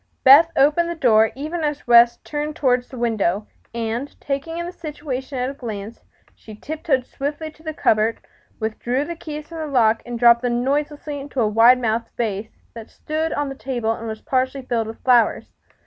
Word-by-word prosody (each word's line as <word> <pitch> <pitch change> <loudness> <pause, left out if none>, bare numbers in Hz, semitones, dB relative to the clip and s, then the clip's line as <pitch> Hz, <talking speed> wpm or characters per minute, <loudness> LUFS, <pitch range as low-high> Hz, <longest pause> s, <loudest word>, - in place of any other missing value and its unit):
Beth 300 +5 +8
opened 305 +5 +3
the 340 - -3
door 225 -7 +4
even 310 +5 -4
as 295 -1 -2
West 235 0 +5
turned 300 0 -4
toward 255 -5 +2
the 255 - -11
window, 215 -4 0 0.3
and, 235 +4 -4
taking 285 +4 -4
in 345 - -3
the 350 - -5
situation 290 -5 -6
at 250 +1 -1
a - - -9
glance, 220 -4 -7 0.3
she 215 - -13
tiptoed 280 0 -2
swiftly 295 +4 -5
to 310 - -22
the 315 -1 -4
cupboard, 225 -6 +1 0.4
withdrew 240 +5 -2
the 340 - -5
keys 305 -2 -8
from 330 -1 -7
the 310 - -3
lock 230 -5 +3
and 240 -1 -6
dropped 235 0 +6
them 240 -1 0
noiselessly 290 +1 -2
into 275 -1 -6
a 225 - +3
wide 230 +4 +6
mouthed 230 -1 -1
vase 215 -2 -2 0.2
that 230 -1 -10
stood 315 +1 -3
on 290 0 -1
the - - -5
table 250 -4 -2
and 225 0 -5
was 220 0 -6
partially 260 -1 -1
filled 230 -3 -1
with 225 - -10
flowers. 245 -3 +3
255 Hz, 195 wpm, -21 LUFS, 230-295 Hz, 0.4 s, Beth